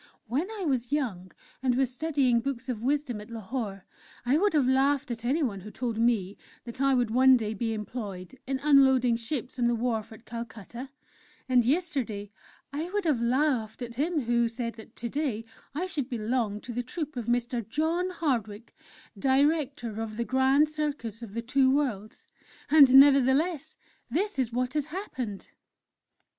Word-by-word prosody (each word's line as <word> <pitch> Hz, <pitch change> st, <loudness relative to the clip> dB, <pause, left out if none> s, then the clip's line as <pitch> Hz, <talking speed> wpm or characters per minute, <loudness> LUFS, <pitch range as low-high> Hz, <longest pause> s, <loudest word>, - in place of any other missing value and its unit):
When 275 Hz, -, -1 dB
I 425 Hz, -4 st, -5 dB
was 255 Hz, -4 st, -1 dB
young 205 Hz, -12 st, -2 dB, 0.3 s
and 255 Hz, -2 st, +2 dB
was 260 Hz, -1 st, +1 dB
studying 270 Hz, -4 st, +2 dB
books 260 Hz, 0 st, -4 dB
of 230 Hz, -4 st, -3 dB
wisdom 260 Hz, -3 st, -1 dB
at 210 Hz, -, -12 dB
Lahore, 220 Hz, -3 st, -5 dB, 0.4 s
I 250 Hz, +3 st, +3 dB
would 405 Hz, +5 st, +2 dB
have 280 Hz, -4 st, +3 dB
laughed 270 Hz, 0 st, +2 dB
at 230 Hz, -1 st, -5 dB
anyone 250 Hz, -5 st, 0 dB
who 210 Hz, -, -9 dB
told 230 Hz, 0 st, -3 dB
me 215 Hz, -5 st, +1 dB, 0.2 s
that 240 Hz, +2 st, -7 dB
I 275 Hz, -1 st, +4 dB
would 245 Hz, -3 st, +1 dB
one 260 Hz, +2 st, +6 dB
day 220 Hz, -2 st, -3 dB
be 225 Hz, +1 st, -2 dB
employed 210 Hz, -4 st, -6 dB
in 270 Hz, 0 st, 0 dB
unloading 265 Hz, -4 st, +5 dB
ships 245 Hz, +2 st, -4 dB
on 240 Hz, -, +3 dB
the 240 Hz, -, +2 dB
wharf 225 Hz, -1 st, -2 dB
at 220 Hz, +1 st, -13 dB
Calcutta; 235 Hz, +2 st, -7 dB, 0.6 s
and 250 Hz, -2 st, +4 dB
yesterday 245 Hz, -, -1 dB, 0.4 s
I 315 Hz, +4 st, -3 dB
would 405 Hz, 0 st, -2 dB
have 290 Hz, -8 st, +2 dB
laughed 245 Hz, -2 st, 0 dB
at 235 Hz, -1 st, -6 dB
him 305 Hz, +5 st, 0 dB
who 235 Hz, -1 st, +2 dB
said 230 Hz, 0 st, -4 dB
that 220 Hz, -, -14 dB
to 235 Hz, -, -4 dB
day 255 Hz, -6 st, -2 dB, 0.3 s
I 345 Hz, +5 st, -1 dB
should 285 Hz, -8 st, -3 dB
belong 225 Hz, -3 st, -1 dB
to 245 Hz, -, -7 dB
the 245 Hz, -, -1 dB
troupe 300 Hz, +4 st, -5 dB
of 240 Hz, -2 st, -4 dB
Mr. 240 Hz, 0 st, 0 dB
John 330 Hz, +7 st, 0 dB
Hardwick, 240 Hz, -, -2 dB, 0.4 s
Director 275 Hz, -4 st, +1 dB
of 220 Hz, -1 st, -5 dB
the 235 Hz, -, -1 dB
'Grand 265 Hz, +4 st, +3 dB
Circus 295 Hz, -8 st, -4 dB
of 220 Hz, -3 st, -9 dB
the 230 Hz, -, -2 dB
Two 260 Hz, +2 st, +3 dB
Worlds' 250 Hz, -7 st, -1 dB, 0.5 s
and 290 Hz, -4 st, +8 dB
nevertheless 280 Hz, +4 st, +5 dB, 0.3 s
that 360 Hz, -, -1 dB
is 245 Hz, -3 st, 0 dB
what 250 Hz, +2 st, -1 dB
has 300 Hz, -2 st, 0 dB
happened!" 260 Hz, -, -6 dB
250 Hz, 170 wpm, -28 LUFS, 230-285 Hz, 0.6 s, and